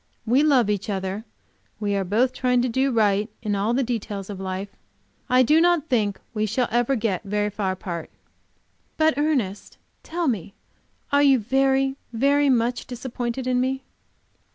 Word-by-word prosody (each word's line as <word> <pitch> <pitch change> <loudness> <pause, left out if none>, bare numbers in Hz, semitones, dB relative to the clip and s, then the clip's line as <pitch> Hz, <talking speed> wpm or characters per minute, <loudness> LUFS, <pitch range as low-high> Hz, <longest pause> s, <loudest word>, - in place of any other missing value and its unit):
We 245 +5 +3
love 275 -7 +4
each 205 +1 -2
other; 195 +2 -3 0.5
we 205 -1 -1
are 195 - 0
both 225 +7 +1
trying 250 -1 +1
to - - +1
do 265 +3 +1
right 210 -2 +2
in 210 -2 -1
all 205 +4 0
the 270 - +2
details 210 -4 -4
of 195 - -7
life. 190 +1 -4 0.6
I 255 +1 +5
do 305 +6 +4
not 345 -3 +2
think 210 -6 +1
we 215 -1 0
shall 245 +4 0
ever 240 +3 +2
get 215 -6 -1
very 210 +1 -1
far 195 -2 -1
apart." 175 -3 -6 0.9
"But, 315 0 +3
Ernest 270 -10 -1 0.2
tell 335 0 -3
me 200 -6 -2 0.6
are 285 0 +4
you 275 -2 +6
very, 270 +3 +1 0.2
very 280 +4 +3
much 240 -1 +1
disappointed 245 0 -4
in 250 -1 +1
me?" 265 +1 -1
235 Hz, 165 wpm, -24 LUFS, 205-265 Hz, 0.9 s, you